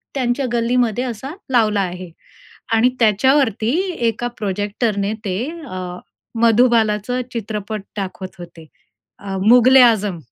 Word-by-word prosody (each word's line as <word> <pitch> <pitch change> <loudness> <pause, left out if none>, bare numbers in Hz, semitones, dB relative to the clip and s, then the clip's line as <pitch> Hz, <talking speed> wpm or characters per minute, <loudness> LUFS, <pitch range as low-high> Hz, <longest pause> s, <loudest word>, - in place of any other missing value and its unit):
त्यांच्या 255 +1 0
गल्लीमध्ये 240 0 +1
असा 245 +4 -6 0.2
लावला 215 -4 +2
आहे 180 -1 -5 0.6
आणि 230 +3 +4
त्याच्यावरती 225 0 +2 0.4
एका 230 +2 -2
प्रोजेक्टरने 205 +1 -2
ते 185 -2 -2 0.3
अ, 185 - -7 0.6
मधुबालाचं 230 0 +2
चित्रपट 215 -2 -4 0.2
दाखवत 190 -1 -6
होते. 170 -2 -11 0.5
अ, 195 -1 -6
मुघल-ए-आझम. 235 -6 +5
220 Hz, 100 wpm, -19 LUFS, 200-245 Hz, 0.6 s, मुघल-ए-आझम